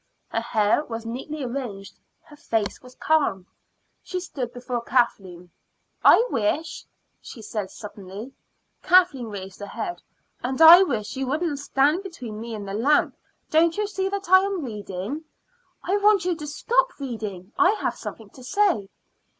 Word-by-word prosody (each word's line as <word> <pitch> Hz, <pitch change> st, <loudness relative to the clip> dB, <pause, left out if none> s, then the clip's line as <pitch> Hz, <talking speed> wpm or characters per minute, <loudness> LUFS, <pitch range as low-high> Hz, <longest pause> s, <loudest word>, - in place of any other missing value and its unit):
Her 225 Hz, -, -1 dB
hair 215 Hz, +4 st, +2 dB
was 225 Hz, -2 st, -6 dB
neatly 270 Hz, +6 st, -5 dB
arranged; 240 Hz, -6 st, -6 dB, 0.2 s
her 295 Hz, -, -16 dB
face 225 Hz, -7 st, -2 dB
was 250 Hz, 0 st, -15 dB
calm. 255 Hz, -13 st, +1 dB, 0.6 s
She 365 Hz, -, -4 dB
stood 265 Hz, -9 st, -5 dB
before 245 Hz, -1 st, -4 dB
Kathleen. 190 Hz, -8 st, -1 dB, 0.5 s
"I 465 Hz, -, +7 dB
wish 285 Hz, +10 st, -1 dB, 0.2 s
" -, -, -48 dB
she 225 Hz, -, -11 dB
said 210 Hz, -2 st, -4 dB
suddenly. 205 Hz, +4 st, -9 dB, 0.5 s
Kathleen 350 Hz, -10 st, +4 dB
raised 195 Hz, -3 st, -8 dB
her 205 Hz, -, -6 dB
head. 350 Hz, -, -5 dB, 0.4 s
"And 260 Hz, +3 st, -2 dB
I 330 Hz, +3 st, +11 dB
wish 240 Hz, -, -1 dB
you 265 Hz, -1 st, -2 dB
wouldn't 300 Hz, +1 st, -1 dB
stand 280 Hz, +4 st, +2 dB
between 250 Hz, -, -8 dB
me 230 Hz, -1 st, -5 dB
and 205 Hz, -2 st, -7 dB
the 195 Hz, -, -5 dB
lamp. 270 Hz, +8 st, +2 dB, 0.4 s
Don't 330 Hz, +2 st, +3 dB
you 420 Hz, -, +1 dB
see 385 Hz, -2 st, -2 dB
that 400 Hz, 0 st, -4 dB
I 375 Hz, +1 st, +8 dB
am 385 Hz, -5 st, -2 dB
reading?" 210 Hz, -, -5 dB, 0.6 s
"I 390 Hz, +3 st, +1 dB
want 410 Hz, -3 st, +4 dB
you 360 Hz, -1 st, +1 dB
to 300 Hz, -2 st, -7 dB
stop 485 Hz, +12 st, 0 dB
reading. 215 Hz, -7 st, -6 dB
I 375 Hz, +2 st, +5 dB
have -, -, -1 dB
something 215 Hz, -3 st, -9 dB
to 255 Hz, -, -14 dB
say." 390 Hz, -, +1 dB
260 Hz, 160 wpm, -24 LUFS, 215-335 Hz, 0.6 s, I